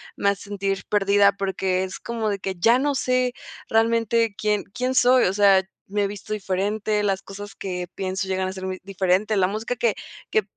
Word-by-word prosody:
me 200 - +2
hace 200 0 -2
sentir 195 -1 -3
perdida, 200 0 +4
porque 190 -1 -1
es 185 - -6
como 225 -2 -3
de 200 - -2
que 190 0 -4
ya 230 +8 +4
no 285 0 0
sé 255 -1 +1 0.3
realmente 230 -1 +2
quién 210 -1 0
quién 250 +1 -1
soy, 255 0 +5
o 185 - +1
sea, 195 -2 +5 0.2
me 205 0 0
visto 205 +1 -9
diferente, 210 +1 -1
las 195 -2 0
cosas 205 +1 -9
que 180 -2 -4
pienso 190 0 -3
llegan 190 0 0
a 185 - -4
ser 190 0 -6
muy 185 0 -4
diferente, 195 +2 +1
la 185 -2 +3
música 220 +4 -3
que 235 -3 +1 0.3
que 215 - +2
200 Hz, 195 wpm, -23 LUFS, 190-220 Hz, 0.3 s, soy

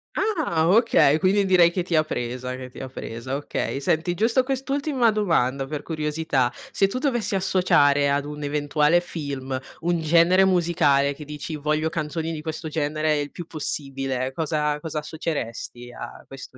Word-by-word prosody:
Ah, 310 - +1
okay, 195 - +5
quindi 195 +1 +3
direi 180 -3 +6
che 180 -1 -1
ti 175 -2 -1
ha 155 - +4
presa, 125 -3 -4
che 130 0 -8
ti - - -12
ha 130 - -6
presa, 125 +1 -5
okay. 140 -1 -3
Senti, 160 +5 0
giusto 230 +6 +3
quest'ultima 270 -2 0
domanda 140 -10 +1
per 150 0 -5
curiosità: 150 -5 -1 0.2
se 195 - +3
tu 225 - -4
dovessi 240 -7 0
associare 145 -7 +3
ad 140 0 0
un 150 0 -7
eventuale 150 +3 +2
film 140 -6 -5 0.2
un 170 0 +1
genere 170 +4 +5
musicale 160 -6 +3
che 150 +2 -10
dici: 150 +2 -6
“Voglio 155 +2 0
canzoni 160 +1 -3
di 155 - -5
questo 160 0 -5
genere 155 0 0
il 145 0 -3
più 175 - -8
possibile”, 135 -4 -3
cosa 150 -1 -1
cosa 155 -1 -4
assoceresti 140 -6 -5
a 120 - -9
questo 135 -1 -11
155 Hz, 165 wpm, -24 LUFS, 140-175 Hz, 0.2 s, direi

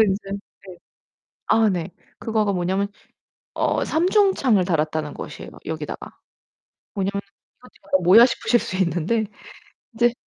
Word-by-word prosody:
인제 195 -2 +1
네. 195 -2 -10 0.7
아 225 -1 +4
네. 180 -1 -2 0.3
그거가 215 -3 0
뭐냐면 190 +3 0 0.7
어 - - 0
삼중창을 335 - +3
달았다는 155 -3 -1
것이에요, - - -8
여기다가. - - -6 0.8
뭐냐면은 200 0 -2 0.4
"이거 250 - -16
지금 - - -24
약간 185 -1 +1
뭐야?" 210 +7 +8
싶으실 245 -1 +1
수 185 - -5
있는데 190 +5 0 0.7
인제 235 +1 +2
200 Hz, 285 characters per minute, -22 LUFS, 180-230 Hz, 0.8 s, 뭐야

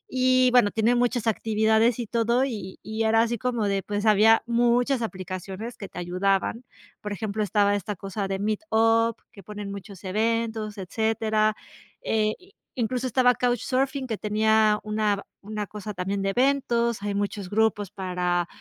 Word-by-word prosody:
Y, 255 0 +4
bueno, 245 -4 +5
tiene 225 +2 +2
muchas 240 -1 0
actividades 220 +1 +2
y 235 - -3
todo, 235 +2 +1
y 205 -7 -6
y 220 +1 -3
era 225 +1 +4
así 235 0 -1
como 240 -4 -1
de, 195 -1 0
pues, 205 +1 -3
había 215 +1 +5
muchas 240 +2 +2
aplicaciones 190 +3 -6
que 200 - -7
te - - -13
ayudaban. 195 +6 0 0.4
Por 210 -1 -4
ejemplo, 215 +1 -3
estaba 205 0 +2
esta 205 +1 -3
cosa 195 +2 -4
de 195 - -2
Meet 210 +1 -1
Up 225 +1 +3 0.2
que 200 -4 -14
ponen 205 +1 -7
muchos 200 0 -9
eventos, 220 +1 -1
etcétera, 215 +2 0 0.5
eh, 215 -1 +1
i 375 +2 -21 0.2
incluso 250 +1 -1
estaba 250 0 +4
Couchsurfing, 260 +3 0
que 220 -4 -3
tenía 215 0 +2
una 215 -1 0
ba - - -9 0.2
una 210 0 -5
cosa 210 0 -7
también 195 +2 -2
de 195 - 0
eventos. 240 -3 +1
Hay 205 -1 -2
muchos 200 -1 -3
grupos 210 -1 +1
para 180 -2 -1
215 Hz, 165 wpm, -25 LUFS, 200-235 Hz, 0.5 s, bueno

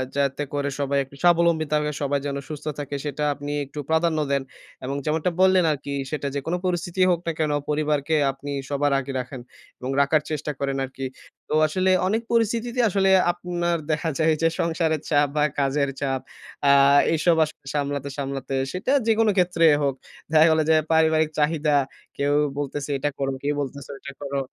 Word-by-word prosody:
যাতে 140 +1 0
করে 145 0 -1
সবাই 140 0 0
একটু 135 +1 -16
স্বাবলম্বিত 170 -3 +3
হবে, 150 0 -1
সবাই 140 0 0
যেন 140 -1 -2
সুস্থ 150 -1 -7
থাকে 145 0 -4
সেটা 150 +1 -3
আপনি 145 +1 -6
একটু 145 +2 -9
প্রাধান্য 160 0 +2
দেন। 140 -1 +1 0.4
এবং 135 +2 -3
যেমনটা 160 +3 0
বললেন 185 -1 +5
আরকি 140 -1 -5 0.2
সেটা 145 -2 -2
যেকোনো 160 +6 -2
পরিস্থিতিই 180 +1 +1
হোক 170 - +1
না - - +2
কেন 155 -2 +1 0.2
পরিবারকে 150 0 0 0.2
আপনি 140 +1 -8 0.2
সবার 145 0 +1
আগে 135 +1 -5
রাখেন 125 0 -6 0.4
এবং 130 +1 -4
রাখার 150 +2 +3
চেষ্টা 150 0 -2
করেন 140 -1 -1
আরকি। 135 0 -7 0.4
তো - - -2
আসলে 185 +4 0 0.2
অনেক 220 +3 +1
পরিস্থিতিতে 235 +2 0
আসলে 195 0 +2 0.2
আপনার 175 -1 -2
দেখা 160 +2 0
যায় 160 0 +4
যে 165 - +4
সংসারের 160 -2 0
চাপ 145 -1 +3
বা 150 - +2 0.2
কাজের 140 +1 +1
চাপ 135 -1 0 0.5
আ - - +8 0.4
এসব 165 +2 +3
আসলে 150 -2 -13
সামলাতে, 140 -1 -2
সামলাতে 135 -1 -4 0.2
সেটা 190 +8 -2 0.2
যেকোন 225 0 +3
ক্ষেত্রেই 170 -4 +4
হোক। 135 -2 0 0.4
দেখা 160 0 +6
গেল 160 0 +3
যে 160 - +6 0.2
পারিবারিক 160 -1 +3
চাহিদা। 150 0 +2 0.4
কেউ 145 +1 +1 0.2
বলতেছে 145 0 -4
এটা 145 +2 -1
করো, 135 0 0
কেউ 145 +1 0
বলতেছে 140 0 -6
ওইটা 140 +1 -9
করো। 140 0 -2
150 Hz, 175 wpm, -24 LUFS, 140-165 Hz, 0.5 s, আ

